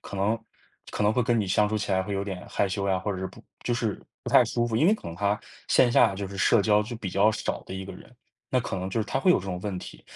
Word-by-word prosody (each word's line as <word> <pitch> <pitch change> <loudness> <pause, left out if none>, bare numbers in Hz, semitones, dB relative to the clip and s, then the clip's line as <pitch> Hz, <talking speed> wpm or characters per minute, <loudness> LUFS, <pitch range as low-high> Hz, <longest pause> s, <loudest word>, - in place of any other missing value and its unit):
可 100 - -8
能 105 +4 +1 0.5
可 - - -2
能 105 +1 +4
会 125 - +2
跟 120 -1 +2
你 105 - 0
相 105 +3 +3
处 110 - -1
起 105 -2 -2
来 95 0 +2
会 100 +2 -4
有 100 0 -1
点 95 -3 -5
害 - - +1
羞 100 +1 -2
呀， 95 -1 +2
或 100 +2 -2
者 95 - -5
是 95 - -3
不 - - -13 0.2
就 120 - 0
是 115 -4 -2 0.2
不 - - -5
太 - - +7
舒 120 0 0
服。 115 - -3
因 150 - +4
为 205 - +5
可 - - -10
能 85 - -6
他 100 +3 0 0.3
线 120 -2 +4
下， 100 - +5
就 100 +1 -4
是 100 +1 -8
社 105 +1 +4
交 105 0 +4
就 120 +3 -6
比 100 -4 -5
较 100 +4 +4
少 105 - -3
的 - - -7
一 95 0 -5
个 95 - -8
人， - - -13 0.4
那 130 - +2
可 120 - -3
能 95 0 -3
就 95 - -2
是 110 - 0
他 105 - -2
会 185 - +4
有 - - +5
这 - - -8
种 90 -2 -4
问 100 -3 -3
题。 - - -10
100 Hz, 345 characters per minute, -27 LUFS, 95-115 Hz, 0.5 s, 太